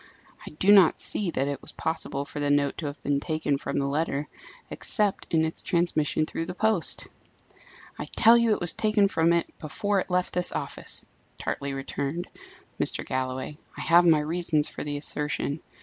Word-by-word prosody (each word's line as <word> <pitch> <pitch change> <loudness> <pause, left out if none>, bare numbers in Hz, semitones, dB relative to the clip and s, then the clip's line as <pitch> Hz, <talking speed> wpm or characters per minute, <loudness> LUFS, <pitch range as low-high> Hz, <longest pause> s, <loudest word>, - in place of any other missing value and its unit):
"I - - -8
do 195 +5 +4
not 195 -5 +7
see 200 -4 +1
that 140 -4 -1
it 140 -2 -3
was - - -9
possible 150 -3 -3
for 145 - -7
the 145 0 0
note 145 -1 +1
to 155 - -3
have 145 - -6
been 140 0 +1
taken 155 -1 -1
from - - -4
the 140 - +1
letter, 145 0 -1 0.4
except 210 -4 -1
in 160 -1 +3
its 160 - -3
transmission 155 -3 +1
through 165 +1 -4
the 180 - -5
post." 220 -4 +1 0.9
"I - - -3
tell 230 +1 +5
you 235 -1 +3
it 210 - +2
was 175 -1 -1
taken 215 -2 +2
from 165 -3 +2
it 170 0 0
before 200 +6 -1
it - - -4
left 180 0 0
this 180 0 +1
office," - - -3 0.3
tartly 140 0 -3
returned 140 +4 -4 0.5
Mr. - - 0
Galloway. 130 +3 -3 0.2
"I - - -5
have 175 +1 +5
my 155 -2 +5
reasons 155 -1 +1
for - - -6
the 145 -1 -3
assertion. 150 0 -2
160 Hz, 185 wpm, -26 LUFS, 145-180 Hz, 0.9 s, not